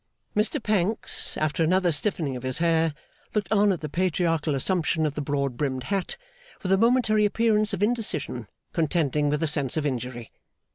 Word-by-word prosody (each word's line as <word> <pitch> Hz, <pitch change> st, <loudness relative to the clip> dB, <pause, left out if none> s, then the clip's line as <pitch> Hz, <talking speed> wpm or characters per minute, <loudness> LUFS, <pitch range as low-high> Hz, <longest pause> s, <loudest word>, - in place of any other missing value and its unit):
Mr 215 Hz, +8 st, +2 dB
Pancks, 210 Hz, 0 st, -1 dB
after 155 Hz, +1 st, 0 dB
another 180 Hz, +2 st, +3 dB
stiffening 150 Hz, -3 st, 0 dB
of 125 Hz, -, -6 dB
his 130 Hz, 0 st, -1 dB
hair, 165 Hz, -2 st, +2 dB, 0.4 s
looked 205 Hz, -2 st, -1 dB
on 205 Hz, -1 st, +4 dB
at 175 Hz, -5 st, -2 dB
the 155 Hz, -, -3 dB
Patriarchal 165 Hz, -2 st, 0 dB
assumption 160 Hz, +2 st, +1 dB
of 150 Hz, -, -1 dB
the 150 Hz, -, -3 dB
broad 140 Hz, -3 st, -1 dB
brimmed 130 Hz, -2 st, -1 dB
hat, 195 Hz, -, -2 dB, 0.5 s
with 185 Hz, -, -1 dB
a 195 Hz, -, +5 dB
momentary 230 Hz, -2 st, +3 dB
appearance 215 Hz, 0 st, +2 dB
of 195 Hz, 0 st, -1 dB
indecision 195 Hz, -, -1 dB, 0.3 s
contending 150 Hz, -3 st, +1 dB
with 150 Hz, +2 st, 0 dB
a -, -, +2 dB
sense 145 Hz, -1 st, 0 dB
of 155 Hz, -, 0 dB
injury. 125 Hz, -3 st, -4 dB
165 Hz, 175 wpm, -26 LUFS, 145-200 Hz, 0.5 s, a